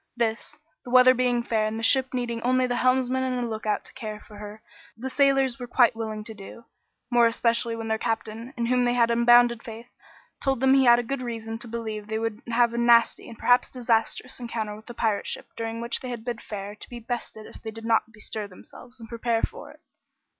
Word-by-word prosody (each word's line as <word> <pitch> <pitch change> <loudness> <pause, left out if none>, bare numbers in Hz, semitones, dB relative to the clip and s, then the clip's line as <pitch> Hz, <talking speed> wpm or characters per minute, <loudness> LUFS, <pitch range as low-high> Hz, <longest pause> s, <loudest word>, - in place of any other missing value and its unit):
This, 230 -1 -2 0.3
the 250 - -10
weather 255 +1 +7
being 245 -1 +1
fair 220 -2 0
and 215 +1 -4
the 225 - -5
ship 260 +2 +4
needing 240 -2 -3
only 255 +1 +2
the 245 -1 -1
helmsman 255 0 +2
and 250 -2 -1
a - - -3
lookout 215 -2 -2
to - - -11
care 215 -4 -6
for 210 -1 -14
her, 210 +1 -10 0.3
the 260 +3 -5
sailors 270 -3 +2
were 245 - -6
quite 240 -1 +4
willing 220 -1 -4
to 220 - -8
do. 210 +3 -12 0.5
More 240 -1 +5
especially 230 0 0
when 225 0 -5
their 220 0 0
captain, 225 +1 -3
in 235 - 0
whom 250 +1 +2
they 245 0 +1
had 235 -1 +3
unbounded 235 0 +5
faith, 230 +1 -10 0.5
told 270 -2 0
them 265 +1 +4
he 270 -1 +5
had 240 -1 +5
good 275 0 -3
reason 225 -2 -5
to 240 - -7
believe 220 -2 -5
they 220 0 -2
would 225 -1 -3
have 235 0 +3
a 235 - -2
nasty, 235 0 +4
and 230 - -11
perhaps 245 0 +3
disastrous, 240 +1 -1
encounter 225 -3 -4
with 215 +1 -15
the 240 - -9
pirate 220 -3 0
ship - - -3
during 225 0 -4
which 235 0 -1
they 250 -2 -5
bid 235 0 -6
fair 205 -1 -6
to 210 - -12
be 245 - -8
bested 230 -2 -6
if - - -13
they 225 - -6
did 225 +1 -9
not 225 -1 +1
bestir 215 -1 -6
themselves 240 +6 -15
and 225 - -10
prepare 230 0 -1
for 485 - -4
it. - - -17
235 Hz, 225 wpm, -25 LUFS, 225-245 Hz, 0.5 s, weather